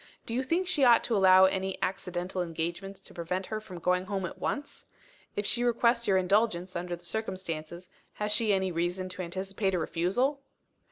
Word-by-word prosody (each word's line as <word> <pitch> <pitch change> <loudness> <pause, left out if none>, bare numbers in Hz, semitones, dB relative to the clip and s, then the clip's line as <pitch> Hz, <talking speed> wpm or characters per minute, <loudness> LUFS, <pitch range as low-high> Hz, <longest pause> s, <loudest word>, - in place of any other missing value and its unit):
Do 230 - -5
you 250 - +1
think 335 +8 0
she 360 -6 +1
ought 240 -2 +6
to 230 - 0
allow 190 -1 +7
any 190 0 0
accidental 180 0 -2
engagements 175 +3 -4
to - - -16
prevent 180 +3 -3
her 215 +1 -4
from 185 -4 -9
going 180 +2 +1
home 195 -1 -2
at - - -7
once? 290 0 -3 0.5
If 205 - -2
she 240 +4 0
requests 235 0 +2
your 195 -2 +4
indulgence, 185 -1 +1
under 175 0 -3
the 175 0 -16
circumstances, 180 -5 -4 0.3
has 210 0 -2
she 215 0 +3
any 190 -1 +1
reason 175 +2 -2
to 185 0 -6
anticipate 190 +2 -2
a - - +1
refusal?" 195 - 0
190 Hz, 185 wpm, -29 LUFS, 180-215 Hz, 0.5 s, allow